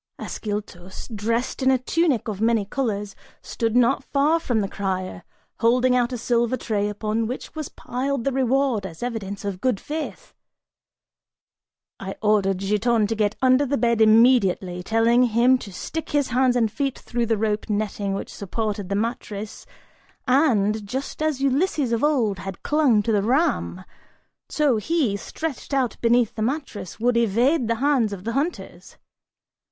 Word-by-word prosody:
Ascyltos, 205 -4 -6
dressed 230 +6 -1
in 260 - +3
a 265 - +4
tunic 275 -1 0
of 210 -2 -4
many 225 -2 +2
colors, 205 -3 -3 0.3
stood 230 -1 -2
not 245 +2 +3
far 295 +5 +2
from 240 -9 0
the 200 - -1
crier, 185 -2 -4 0.4
holding 250 +2 +3
out 245 0 +1
a 250 - -3
silver 240 +1 +1
tray 210 -4 -1
upon 215 +2 -2
which 250 +3 -6
was 310 -3 -5
piled 260 +1 -3
the 275 - 0
reward, 260 -3 +1
as 170 +1 -8
evidence 205 -5 -4
of 195 -2 -4
good 250 -6 +1
faith. 320 +11 -6 1.7
I 195 0 -6
ordered 205 -3 +2
Giton 210 +3 +1
to 225 +2 -2
get 210 0 0
under 255 +2 +5
the 285 0 0
bed 235 -2 +1
immediately, 215 -5 +4
telling 225 +5 +3
him 245 +2 +4
to 205 - -9
stick 320 - -5
his 290 -2 +1
hands 250 +1 +2
and 225 -3 +2
feet 275 0 -2
through 240 -1 -3
the 225 -1 +1
rope 210 +1 -1
netting 205 -1 -1
which - - -6
supported 205 -1 -3
the 200 - -1
mattress, 215 -1 -4 0.6
and, 220 -6 +2
just 265 +9 -5
as 310 -4 0
Ulysses 275 -1 +1
of 230 +2 0
old 240 -10 +1
had 190 0 -7
clung 280 -9 +3
to 225 - 0
the 205 -2 +2
ram, 250 - 0 0.6
so 290 -6 +2
he, 260 -2 0
stretched 285 +6 -5
out 260 -3 0
beneath 235 -1 +3
the 220 - -6
mattress, 235 - -4
would 245 +2 +2
evade 235 +5 +2
the 230 - +1
hands 260 -3 +2
of 190 -2 -7
the 230 - -3
hunters. 290 +7 -4
230 Hz, 160 wpm, -23 LUFS, 210-260 Hz, 1.7 s, under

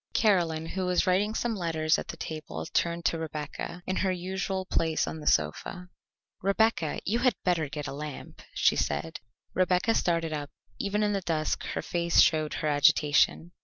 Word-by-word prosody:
Caroline, 170 -7 +2
who 185 +2 -3
was 180 +2 +2
writing 200 +4 +2
some 235 -1 -1
letters 160 -4 +1
at - - -6
the - - -7
table, 150 - -6
turned 170 0 -1
to 165 - +1
Rebecca, 160 +2 -5
in 185 - -2
her 190 - +1
usual 190 +1 -3
place 160 -3 +1
on 160 - -5
the 150 - -8
sofa. 180 - 0 0.5
"Rebecca, 195 -5 +1
you 225 +5 +1
had 250 -4 +3
better 165 -5 +1
get 150 0 -5
a 135 - -5
lamp," 150 0 -8
she - - +3
said. 70 +3 -2 0.3
Rebecca 185 +4 +2
started 165 -5 0
up; 145 -1 -4 0.3
even 210 +1 0
in 205 0 +1
the 195 - -1
dusk 160 -3 -1
her - - -2
face 170 -1 +1
showed 155 -1 +4
her 155 - -2
agitation. 150 +2 +3
170 Hz, 175 wpm, -28 LUFS, 155-190 Hz, 0.5 s, showed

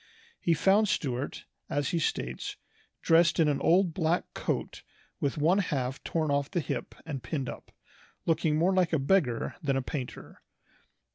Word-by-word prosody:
He 170 - +2
found 200 +6 +4
Stuart, 130 -1 -2 0.2
as 145 -1 0
he 170 - 0
states, 65 - -2 0.5
"dressed 165 0 +4
in 160 - +5
an 145 -2 +1
old 175 0 +4
black 165 +1 +1
coat - - -3 0.4
with 140 0 -1
one 165 +7 +3
half 135 -8 -2
torn 155 -3 -1
off 140 0 +1
the 175 - -1
hip 155 - -4
and 145 -5 -4
pinned 135 -2 -3
up, - - -8 0.5
looking 160 -1 +2
more 175 +4 +3
like 180 -3 +2
a - - +4
beggar 135 -5 +1
than 140 -4 +1
a 135 - -1
painter." 130 -2 -6
155 Hz, 160 wpm, -29 LUFS, 140-170 Hz, 0.5 s, in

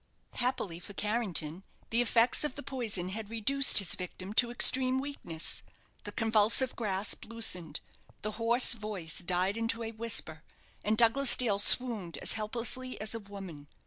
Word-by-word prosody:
Happily 240 -9 -2
for 190 +3 -10
Carrington, 195 -7 -1 0.3
the 230 +1 +5
effects 240 +2 +3
of 300 -4 -3
the 285 - -7
poison 220 -9 -3
had 210 +2 -6
reduced 270 +5 +3
his 195 -3 +4
victim 185 +2 -7
to 240 +2 +4
extreme 255 +1 +2
weakness. 265 - -3 0.4
The - - -5
convulsive 225 +3 +2
grasp 200 -3 -2
loosened, 220 -8 -2 0.4
the 215 - -3
hoarse 235 +3 +5
voice 210 -8 -4
died 180 +3 0
into 230 0 -1
a 225 - -5
whisper, 215 -8 -1 0.4
and 215 +1 0
Douglas 240 +3 +5
Dale 215 -6 0
swooned 210 -6 +2
as - - -1
helplessly 235 +4 -2
as 215 +2 -3
a 230 - -4
woman. 195 -8 -11
220 Hz, 150 wpm, -30 LUFS, 190-240 Hz, 0.4 s, the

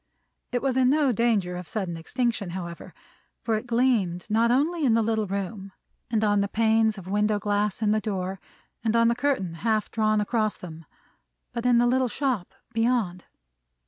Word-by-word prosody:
It 245 0 -1
was 265 -2 +1
in 255 -1 +4
no 290 -1 +3
danger 215 -6 +1
of 180 -2 -7
sudden 190 -6 -3
extinction, 225 +4 -2
however; 170 -2 -7 0.5
for 230 - 0
it 220 +3 -2
gleamed 230 -8 +1
not 230 +2 +3
only 305 +7 +1
in 240 -5 +4
the 230 - +3
little 220 -1 0
room, 195 0 -5 0.4
and 220 -2 +1
on 205 -1 +3
the 200 - 0
panes 220 0 +2
of 190 - -9
window 210 +2 +1
glass 205 +1 -1
in 210 - +3
the 215 0 +2
door, 190 -2 -3 0.4
and 225 0 +1
on 230 0 +5
the 235 - +1
curtain 245 -10 0
half 220 -1 0
drawn 215 -1 +2
across 215 0 0
them, 165 -2 -10 0.7
but 235 +1 -1
in 245 -1 +5
the 240 - +4
little 255 +1 +2
shop 250 -7 -2 0.2
beyond. 225 -6 0
220 Hz, 180 wpm, -26 LUFS, 200-240 Hz, 0.7 s, on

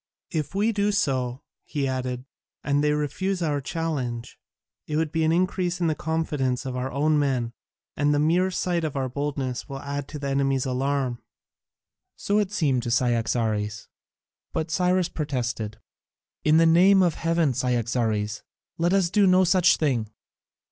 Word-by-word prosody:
If 155 +3 -3
we 210 +3 +2
do 205 -1 +1
so," 130 -10 -1 0.2
he 140 -3 -2
added, 130 -1 -3 0.4
"and 145 0 +1
they 150 - +3
refuse 175 +5 -1
our 145 -3 0
challenge, 130 -7 -3 0.5
it 150 - -3
will 160 0 +1
increase 180 0 0
the 170 -3 +1
confidence 150 -6 -1
of 130 -1 -4
our 130 +1 -3
own 150 +3 +2
men, 125 -5 0 0.4
and 145 0 +2
the 145 - +2
mere 170 +5 +3
sight 180 -2 -1
of 155 -3 -3
our 135 -1 -1
boldness 135 -1 -3
will 135 - -5
add 140 0 -4
to 150 - -7
the 140 -1 -4
enemy's 135 -1 +1
alarm." 130 -1 -1 0.9
So 205 +1 0
it 205 -2 0
seemed 145 -11 +1
to 120 - -4
Cyaxares, 115 -3 0 0.6
but 160 0 -2
Cyrus 180 +1 +2
protested: 120 -7 -3 0.7
"In 155 +1 +5
the 165 - +5
name 185 +4 +6
of 175 -3 +2
heaven, 165 -4 +1
Cyaxares, 115 -4 -1 0.4
let 175 +2 +2
us 190 -3 +2
do 205 -1 +4
no 185 0 +5
such 185 0 +4
thing. 125 -8 0
145 Hz, 155 wpm, -25 LUFS, 125-170 Hz, 0.9 s, name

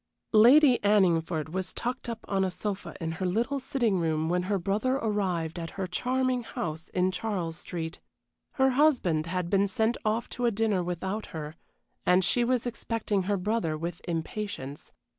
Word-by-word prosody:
Lady 250 +4 +7
Anningford 170 -6 +2
was 185 +2 -3
tucked 245 0 -3
up 230 -1 -6
on 195 -1 +1
a 190 - +1
sofa 200 +2 -4
in 165 -2 -2
her 180 +3 -3
little 235 +9 0
sitting 240 -7 0
room 160 -1 0
when 180 +1 +2
her 205 - +2
brother 205 +8 0
arrived 185 - -1
at 165 -1 -4
her 190 - -1
charming 255 +6 0
house 160 -7 -5
in 185 0 +1
Charles 185 -5 -3
Street. 165 -1 -5 0.5
Her 265 0 +3
husband 250 - +3
had 180 0 -2
been 195 +2 +3
sent 225 +3 +1
off 220 +1 0
to 245 -1 -1
a - - +5
dinner 210 -3 +1
without 190 +4 -3
her, 150 0 -5 0.5
and 180 0 +4
she 245 - +2
was 250 0 +1
expecting 230 -4 -1
her 205 - +2
brother 180 -5 -1
with 170 +2 -5
impatience. 165 -4 -4
195 Hz, 170 wpm, -28 LUFS, 170-230 Hz, 0.5 s, Lady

